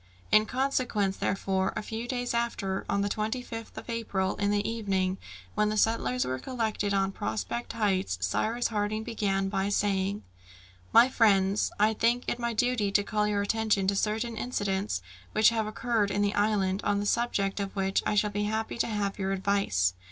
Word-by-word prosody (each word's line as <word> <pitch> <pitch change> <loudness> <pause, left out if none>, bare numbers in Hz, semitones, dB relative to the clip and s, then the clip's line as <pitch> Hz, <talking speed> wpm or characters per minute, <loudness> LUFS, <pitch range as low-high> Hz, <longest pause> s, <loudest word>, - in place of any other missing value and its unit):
In 215 0 +5
consequence 250 -7 0
therefore, 190 0 0
a - - -3
few 225 +2 -5
days 245 -1 -2
after, 215 -5 -1
on 200 - +1
the 200 - +1
25th 225 +2 -4
of - - -8
April, 215 -5 -1
in 205 0 +1
the 205 0 +1
evening, 195 -4 -1 0.3
when 210 0 +2
the 215 - -1
settlers 230 +3 +1
were 130 - -2
all - - -11
collected 220 -5 -2
on 195 -1 +1
Prospect 110 - -3
Heights, 195 - 0
Cyrus 220 - 0
Harding 215 0 -1
began 195 -4 -1
by 195 0 -1
saying, 200 0 0 0.7
"My 235 +2 +8
friends, 200 -5 +3
I 215 +1 +4
think 235 +3 +1
it 240 - -1
my 235 0 -1
duty 225 -3 +1
to 205 +1 +3
call 210 +1 0
your 205 -1 +1
attention 215 -2 +1
to 200 - 0
certain 220 +3 -1
incidents 195 - -2 0.3
which 215 0 +6
have 225 -2 -1
occurred 220 -1 0
in 205 +1 0
the 205 0 +1
island, 205 -2 +1
on 205 0 +1
the 205 - -2
subject 205 -3 0
of 200 0 -4
which 195 -1 +1
I 210 - 0
shall 210 0 +2
be 205 0 -1
happy 220 +2 -2
to - - +2
have 205 -2 -2
your 190 0 -1
advice. 190 - +1
205 Hz, 185 wpm, -28 LUFS, 195-225 Hz, 0.7 s, My